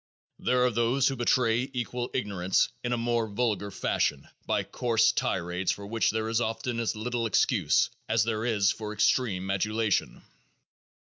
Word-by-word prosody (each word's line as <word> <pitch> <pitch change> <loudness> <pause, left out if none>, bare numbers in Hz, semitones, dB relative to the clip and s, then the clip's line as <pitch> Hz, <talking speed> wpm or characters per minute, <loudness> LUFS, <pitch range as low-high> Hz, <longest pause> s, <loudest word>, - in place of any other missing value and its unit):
There 125 0 +2
are 125 - +4
others 120 +3 +2
who 135 - 0
betray 120 0 +1
equal 125 0 -3
ignorance 100 -6 +1
in 120 - -2
a 120 - +1
more 115 -1 0
vulgar 105 -1 -1
fashion 95 - -1 0.2
by - - +1
coarse 115 -3 +2
tirades 90 +2 -1
for 100 - -6
which 115 +2 +1
there 110 0 -1
is 115 +1 0
often 115 +1 -2
as 115 -2 -1
little 115 +1 -2
excuse 105 - +2 0.2
as 110 0 +3
there 110 -1 -2
is 105 -4 +2
for 110 -1 -6
the - - -5
extreme 95 -6 +1
adulation. 105 +2 0
115 Hz, 165 wpm, -28 LUFS, 105-120 Hz, 0.2 s, are